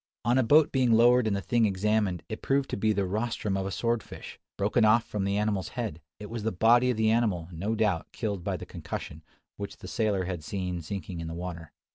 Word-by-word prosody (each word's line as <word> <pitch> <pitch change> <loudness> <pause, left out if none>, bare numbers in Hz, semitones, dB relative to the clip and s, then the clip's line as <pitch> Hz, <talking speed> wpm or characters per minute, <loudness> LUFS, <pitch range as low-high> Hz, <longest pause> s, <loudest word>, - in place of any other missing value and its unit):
On 120 +3 +3
a - - +4
boat 150 +6 +5
being 130 -4 +3
lowered 120 +1 +5
and 105 - +1
the 100 - -3
thing 120 -2 +2
examined, 100 -2 0
it 110 - -6
proved 135 0 0
to - - 0
be 110 +2 +1
the 100 -2 0
rostrum 105 0 -2
of 95 0 -1
a - - -4
sword 115 +2 0
fish, - - -10 0.2
broken 105 +4 +2
off 110 +2 +5
from 100 -2 -3
the 100 +1 0
animal's 105 -4 0
head. 80 +3 -3 0.2
It 105 - -7
was 115 +1 -5
the 110 +2 -1
body 120 +6 +4
of 125 - 0
the 110 0 +3
animal, 105 -8 +1
no 100 +7 -2
doubt, 105 -6 0
killed 100 -6 -3
by - - -2
the - - -8
concussion, 80 - -7 0.4
which 100 0 -6
the - - -10
sailor 105 -6 0
had 90 -4 -4
seen 90 0 -3
sinking 90 0 -6
in 85 - -5
the 80 - -5
water. 85 -2 -6
105 Hz, 235 wpm, -28 LUFS, 95-115 Hz, 0.4 s, boat